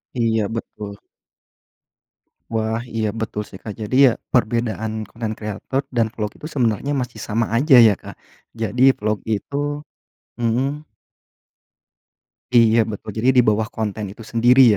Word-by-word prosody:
Iya, 115 Hz, -3 st, +1 dB
betul. 105 Hz, -3 st, -6 dB, 1.6 s
Wah, 110 Hz, 0 st, 0 dB, 0.2 s
iya 110 Hz, -1 st, +1 dB
betul 110 Hz, -1 st, -3 dB
sih 95 Hz, -, -11 dB
Kak. 105 Hz, -, -5 dB
Jadi 105 Hz, +4 st, -2 dB
ya, 125 Hz, -, +5 dB, 0.2 s
perbedaan 115 Hz, -2 st, +1 dB, 0.2 s
konten 115 Hz, -2 st, -4 dB
kreator 110 Hz, +6 st, -3 dB, 0.2 s
dan 115 Hz, -, +3 dB
vlog 105 Hz, -2 st, -2 dB
itu 155 Hz, -, -7 dB
sebenarnya 120 Hz, +2 st, +1 dB
masih 120 Hz, -3 st, -6 dB
sama 115 Hz, +2 st, +1 dB
aja 135 Hz, +3 st, +5 dB
ya 105 Hz, -, +4 dB
Kak, -, -, -10 dB, 0.5 s
jadi 115 Hz, +4 st, +1 dB, 0.2 s
vlog 105 Hz, 0 st, 0 dB, 0.2 s
itu 140 Hz, +7 st, -7 dB, 0.8 s
hmm. 135 Hz, +6 st, -1 dB, 1.7 s
Iya 115 Hz, -1 st, +5 dB
betul, 110 Hz, 0 st, -6 dB
jadi 130 Hz, +3 st, +3 dB
dibawah 110 Hz, -3 st, +3 dB
konten 110 Hz, -2 st, -4 dB
itu 105 Hz, +4 st, -10 dB
sendiri 120 Hz, +4 st, +5 dB
110 Hz, 130 wpm, -21 LUFS, 110-120 Hz, 1.7 s, ya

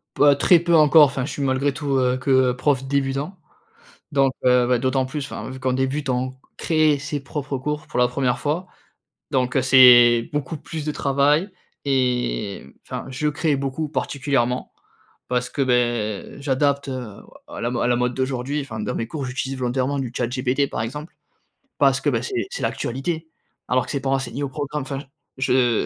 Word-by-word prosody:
P -, -, -4 dB
heu, 145 Hz, -1 st, +7 dB
très 170 Hz, +5 st, +5 dB
peu 170 Hz, 0 st, +2 dB
encore, 155 Hz, 0 st, +7 dB
enfin, 135 Hz, -2 st, -2 dB
je 140 Hz, -, -5 dB
suis 145 Hz, -, -5 dB
malgré 135 Hz, +1 st, +1 dB
tout, 140 Hz, -1 st, -1 dB
heu, 125 Hz, 0 st, +1 dB
que 130 Hz, -1 st, +3 dB
prof 135 Hz, +1 st, 0 dB
débutant, 140 Hz, +6 st, -1 dB, 0.8 s
donc, 135 Hz, -1 st, +3 dB
heu, 125 Hz, -1 st, +4 dB
bah, 125 Hz, 0 st, +2 dB
d'autant 130 Hz, +1 st, +1 dB
plus, 145 Hz, +1 st, -4 dB
enfin, -, -, -7 dB
vu 130 Hz, 0 st, -8 dB
qu'on 130 Hz, 0 st, 0 dB
débute 135 Hz, +2 st, -1 dB
on 130 Hz, +1 st, -1 dB, 0.2 s
crée 155 Hz, -3 st, +2 dB
ses 145 Hz, +1 st, -4 dB
propres 140 Hz, 0 st, -4 dB
cours 150 Hz, +3 st, -4 dB
pour 145 Hz, -, -4 dB
la 125 Hz, -, +4 dB
1re 125 Hz, -1 st, 0 dB
fois, 160 Hz, +5 st, -2 dB, 0.6 s
donc, 125 Hz, 0 st, 0 dB
heu, 130 Hz, -, +3 dB
c'est 120 Hz, -3 st, +7 dB
beaucoup 150 Hz, +1 st, -3 dB
plus 155 Hz, +1 st, -7 dB
de 150 Hz, -, -2 dB
travail 145 Hz, +7 st, +2 dB, 0.4 s
et 125 Hz, -, 0 dB
mmh, 70 Hz, -, -16 dB, 0.2 s
enfin, -, -, -5 dB
je 145 Hz, +4 st, -1 dB
crée 150 Hz, -1 st, 0 dB
beaucoup 140 Hz, +3 st, -3 dB
particulièrement 135 Hz, -3 st, -1 dB, 0.6 s
parce 125 Hz, 0 st, -1 dB
que, 140 Hz, -, -3 dB
beh, 120 Hz, -2 st, 0 dB
j'adapte, 140 Hz, 0 st, 0 dB
heu, 125 Hz, -6 st, -6 dB, 0.3 s
o -, -, -13 dB
à -, -, -6 dB
la 120 Hz, -, 0 dB
à -, -, +1 dB
la 120 Hz, -, +3 dB
mode 125 Hz, 0 st, 0 dB
d'aujourd'hui, 130 Hz, +2 st, -2 dB
enfin, 110 Hz, -5 st, -7 dB
dans -, -, -3 dB
mes 115 Hz, -, -3 dB
cours, 145 Hz, +1 st, -5 dB
j'utilise 130 Hz, +1 st, -4 dB
volontairement 130 Hz, +2 st, -1 dB
du 125 Hz, -3 st, -3 dB
chat 120 Hz, -, 0 dB
GPT 130 Hz, +3 st, 0 dB
par -, -, -3 dB
exemple, 150 Hz, +8 st, -6 dB, 0.7 s
parce -, -, +3 dB
que, -, -, -1 dB
bah, -, -, -1 dB
c'est 385 Hz, -4 st, -2 dB
c'est 390 Hz, -, -5 dB
l'actualité. 160 Hz, +6 st, -3 dB, 0.4 s
Alors 125 Hz, 0 st, +2 dB
que -, -, -8 dB
c'est 140 Hz, -, -1 dB
pas 135 Hz, 0 st, -2 dB
enseigné 135 Hz, +1 st, -2 dB
au 140 Hz, -, -1 dB
programme. 145 Hz, +1 st, -4 dB
Enfin, 135 Hz, +1 st, -4 dB
j 145 Hz, -, -12 dB, 0.3 s
je 125 Hz, -3 st, +2 dB
135 Hz, 195 wpm, -22 LUFS, 125-145 Hz, 0.8 s, heu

